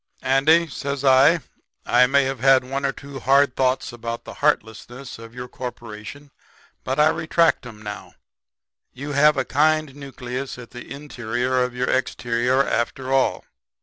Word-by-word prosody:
"'Andy,' 155 +6 +4
says 140 -2 -4
I, 140 +5 +5 0.4
'I 125 - +4
may 140 +1 +3
have 135 -1 -3
had 135 +1 +5
one 135 +2 -2
or - - 0
two 140 -1 -10
hard 135 +1 +3
thoughts 130 -1 0
about 115 0 -5
the - - -8
heartlessness 120 +4 -2
of 115 +1 -12
your 125 0 -6
corporation, 125 +3 -9 0.5
but 130 +3 -2
I 150 +1 +6
retract 160 -4 +1
'em 110 -2 -12
now. 105 -1 -8 0.8
You 140 +3 -6
have 150 +1 +4
a 135 - 0
kind 155 0 +1
nucleus 130 -2 -6
at 125 -2 -11
the 125 -1 -10
interior 130 -3 -2
of 125 0 -2
your 125 0 -1
exterior 125 +1 +1
after 130 +3 -2
all. 135 -1 +1
130 Hz, 155 wpm, -22 LUFS, 125-140 Hz, 0.8 s, I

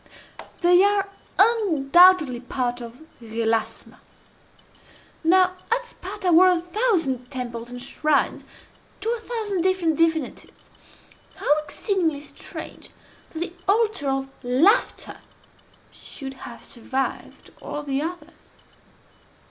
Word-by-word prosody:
They 355 +1 +6
are 405 -1 +2 0.3
undoubtedly 355 - +5
part 245 -1 -3
of 235 +4 -10 0.2
ΓΕΛΑΞΜΑ. 225 0 -2 1.2
Now, 365 +2 +4 0.2
at - - +1
Sparta 375 -5 -4
were 350 +3 +7
a 360 -2 +3
thousand 340 - 0
temples 240 -3 -6
and 245 0 -7
shrines 285 +3 0 0.6
to 445 - -2
a 475 - -2
thousand 435 -5 -3
different 355 -4 +1
divinities. 320 -4 -1 0.6
How 295 - +2
exceedingly 325 -1 -1
strange 290 - -9 0.4
that 320 - -7
the 345 - -3
altar 410 -8 +2
of 270 0 -1
Laughter 275 - +2 0.7
should 270 -2 -8 0.2
have 235 - -11
survived 260 +3 -4
all 295 - -5
the 275 -1 -1
others! 345 +3 -6
320 Hz, 105 wpm, -24 LUFS, 265-375 Hz, 1.2 s, were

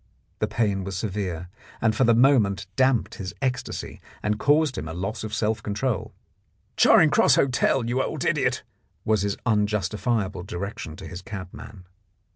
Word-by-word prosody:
The 105 - +1
pain 105 -3 0
was 95 -1 -4
severe, 95 -4 -3 0.3
and 110 -1 +2
for 130 - +3
the 115 0 +5
moment 115 -7 +3
damped 130 -3 +2
his 95 - -6
ecstasy 130 -2 -3 0.2
and 105 0 0
caused 145 -2 +3
him 80 - -5
a 80 - -6
loss 100 +4 -4
of 110 - -5
self 110 0 0
control. 105 +1 -2 0.6
"Charing - - +6
Cross - - +5
Hotel, 130 -1 +2
you 120 +3 0
old - - -3
idiot!" - - +1 0.4
was 110 -2 +2
his 100 0 -1
unjustifiable 105 -2 0
direction 90 -3 -6
to - - -9
his 90 0 -8
cabman. 95 0 -9
105 Hz, 155 wpm, -25 LUFS, 95-120 Hz, 0.6 s, Charing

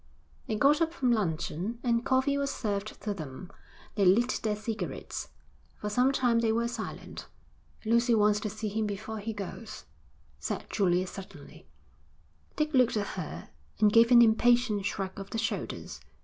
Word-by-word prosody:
They 220 - -1
got 285 +8 +4
up 325 0 +1
from 255 -5 +1
luncheon, 185 +1 -1
and 235 -1 +1
coffee 265 +2 +2
was 280 0 0
served 210 -5 -3
to 210 -1 -1
them. 160 +1 -8 0.4
They 200 - +1
lit 225 +7 +4
their 215 -2 0
cigarettes. 220 +1 -5 0.5
For 210 - -4
some 250 +5 +3
time 245 -4 +2
they 230 -1 +2
were 230 +1 +1
silent. 240 - -7 0.6
'Lucy 235 +1 +3
wants 210 -1 +3
to 215 - -3
see 215 +1 -4
him 215 +1 -1
before 215 +2 -5
he 215 +2 -4
goes,' 205 +1 -7 0.6
said - - -3
Julia 185 -2 +2
suddenly. 190 +1 -11 0.9
Dick 305 0 -1
looked 250 -4 +4
at 205 -1 -2
her 120 - -6 0.3
and 210 -1 +4
gave 230 0 +6
an 240 -1 +8
impatient 225 -2 +3
shrug 195 -1 -3
of 195 - -7
the 225 - -4
shoulders. 225 - -3
220 Hz, 165 wpm, -29 LUFS, 200-240 Hz, 0.9 s, an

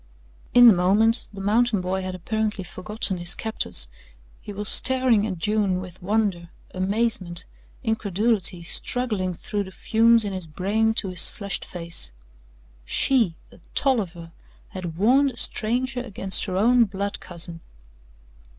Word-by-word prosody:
In 245 0 +9
the 225 - +9
moment, 205 +6 +2
the 200 - -10
mountain 220 +2 +2
boy 185 +1 -2
had 185 0 -5
apparently 210 +2 -3
forgotten 190 +2 -4
his 175 0 +2
captors 90 - 0 0.5
he - - -10
was 205 +1 -4
staring 255 -5 +5
at 190 -4 -5
June 200 0 0
with 185 0 -10
wonder, 195 -3 -1 0.2
amazement, 190 -2 -2 0.4
incredulity 210 -4 -1
struggling 195 -1 -2
through 205 +4 -4
the - - -10
fumes 230 +2 +3
in 200 - -4
his 185 -3 -4
brain 210 +7 0
to 195 - 0
his 180 -2 +4
flushed 200 -2 -5
face. 170 - -3 0.7
She 225 - +1 0.2
a - - -18 0.2
Tolliver 185 -11 -1 0.4
had 175 -4 -7
warned 260 +7 +3
a - - -16
stranger 250 +3 -1
against 195 -5 +2
her 185 -2 -3
own 235 +4 +4
blood 200 0 -4
cousin. 170 -1 -7
200 Hz, 140 wpm, -23 LUFS, 180-225 Hz, 0.7 s, In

